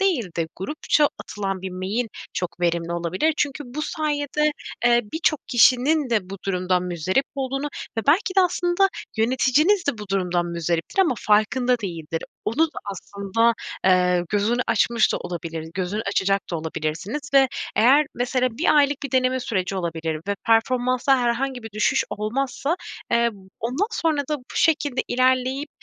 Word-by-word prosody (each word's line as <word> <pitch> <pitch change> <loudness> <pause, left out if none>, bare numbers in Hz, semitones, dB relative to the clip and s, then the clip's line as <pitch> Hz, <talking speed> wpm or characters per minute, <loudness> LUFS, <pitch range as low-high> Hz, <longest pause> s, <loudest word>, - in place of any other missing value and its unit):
değil 360 - +2
de 165 -1 0
grupça 295 - +1
atılan 195 -2 -4
bir 190 - -4
mail 195 +6 -2 0.3
çok 180 0 -4
verimli 170 0 0
olabilir. 180 - 0
Çünkü 290 0 -1
bu 290 +5 -5
sayede, 300 -1 0 0.3
eee, 240 0 +5
birçok 320 -2 +1
kişinin 255 +2 +4
de 200 -5 0
bu 195 - -6
durumdan 180 -1 +1
muzdarip 180 - 0
olduğunu 275 +1 -2 0.3
ve - - 0
belki 375 +5 +3
de - - +7
aslında 355 +1 +2 0.3
yöneticiniz 260 - +3
de 240 -6 0
bu 210 -2 -8
durumdan 180 -3 0
muzdariptir 170 - -2
ama 325 - +1
farkında 245 +4 +2
değildir. 165 -5 -5 0.2
Onun 315 +9 +2 0.2
aslında, 200 +3 0 0.3
eee, 180 -1 +3
gözünü 215 +4 +1
açmış 235 -2 +2
da - - 0
olabilir, 165 -2 -6
gözünü 190 +4 -2
açacak 195 0 +1
da 170 - -1
olabilirsiniz 160 - -3
ve 270 -1 +6 0.3
eğer, 275 +6 +5
mesela 250 +1 +1
1 320 - +3
aylık 285 -1 +3
bir 280 - -4
deneme 255 0 +2
süreci 195 -5 -2
olabilir 165 -3 -3
ve 200 - +1
performansta 255 +3 +3
herhangi 245 +1 -1
bir 225 - -8
düşüş 210 +1 +1
olmazsa, 265 - -2 0.3
eee, 235 0 +3 0.3
ondan 260 - 0
sonra 320 -3 0
da 300 - 0
bu 250 - -19
şekilde 290 -5 +2
ilerleyip, 255 +3 +1
235 Hz, 150 wpm, -23 LUFS, 185-275 Hz, 0.3 s, de